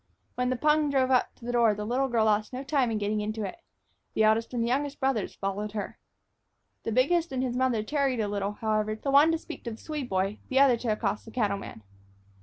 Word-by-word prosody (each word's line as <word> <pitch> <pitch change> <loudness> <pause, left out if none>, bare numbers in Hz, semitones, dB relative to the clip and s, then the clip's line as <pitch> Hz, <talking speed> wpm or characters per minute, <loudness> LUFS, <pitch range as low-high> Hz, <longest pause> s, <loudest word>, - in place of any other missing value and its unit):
When 250 0 -1
the 255 - +1
pung 300 +3 +2
drove 265 -2 +2
up 255 - +2
to 235 - -14
the 245 - -2
door 235 -3 +3
the 210 0 -4
little 255 +4 +1
girl 230 -3 +2
lost 215 +2 +1
no 255 +2 -4
time 275 -3 +1
in 220 - -1
getting 210 0 -1
into 215 0 -3
it. 270 - -6 0.6
The 220 - +3
eldest 220 +1 +3
and 240 -2 -1
the - - 0
youngest 280 +3 -1
brothers 265 -7 -1
followed 200 +2 -3
her. 210 -2 -5 0.8
The - - -3
biggest 320 +7 +2
and 260 -1 -1
his 250 -2 -2
mother 250 -4 +1
tarried 275 0 0
a 215 - 0
little, 200 0 -2
however, 215 0 -1
the 275 +6 -3
one 290 +4 +6
to 330 - +1
speak 320 0 -10
to - - -2
the 220 - -8
Swede 295 -3 -5
boy, 190 +2 -1
the 265 - 0
other 270 -2 +6
to 235 - -6
accost 210 -1 -1
the - - -10
cattleman. 200 - -3
235 Hz, 235 wpm, -28 LUFS, 215-270 Hz, 0.8 s, one